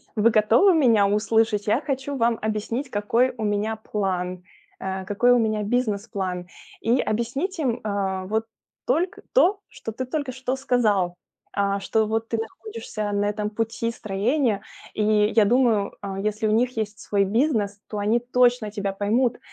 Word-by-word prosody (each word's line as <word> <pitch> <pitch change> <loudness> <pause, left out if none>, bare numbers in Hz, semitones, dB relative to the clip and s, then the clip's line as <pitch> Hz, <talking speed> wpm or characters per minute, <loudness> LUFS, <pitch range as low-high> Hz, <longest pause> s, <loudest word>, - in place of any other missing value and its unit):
"Вы 220 +1 +4
готовы 225 - +5
меня 230 -9 +4
услышать? 210 0 +1
Я 225 +6 +2
хочу 275 0 -3
вам 230 -1 +2
объяснить 220 +5 -2
какой 230 +5 +1
у 220 - -4
меня 210 +1 0
план, 185 -4 -3 0.4
э, 190 0 -4
какой 205 +6 +3
у 245 - +4
меня 215 -2 0
бизнес-план". 200 -5 -2 0.3
И 235 +3 +2
объяснить 270 - -2
им, 255 -7 0
а, 195 -3 -2
вот 220 +3 -1 0.4
только 360 +9 0
то, 405 -4 +4
что 225 - -7
ты 255 +4 -4
только 280 +1 -3
что 260 0 -2
сказал. 215 -9 +1 0.4
А, 200 0 0
что 220 +2 +1
вот 225 +1 -2
ты 230 - 0
находишься 225 - -5
на 205 0 0
этом 210 0 -1
пути 225 +1 -2
строения 215 +2 0 0.3
и, 215 - -1
я 210 0 +4
думаю, 225 -3 +2
а, 195 -1 -5
если 215 +2 -1
у - - +1
них 240 +3 +1
есть 215 -1 -3
свой 200 -1 +1
бизнес, 215 -2 0
то 210 - -4
они 210 +3 +2
точно 245 -2 +2
тебя 200 -2 -3
поймут, 230 +5 +1
220 Hz, 165 wpm, -24 LUFS, 205-245 Hz, 0.4 s, готовы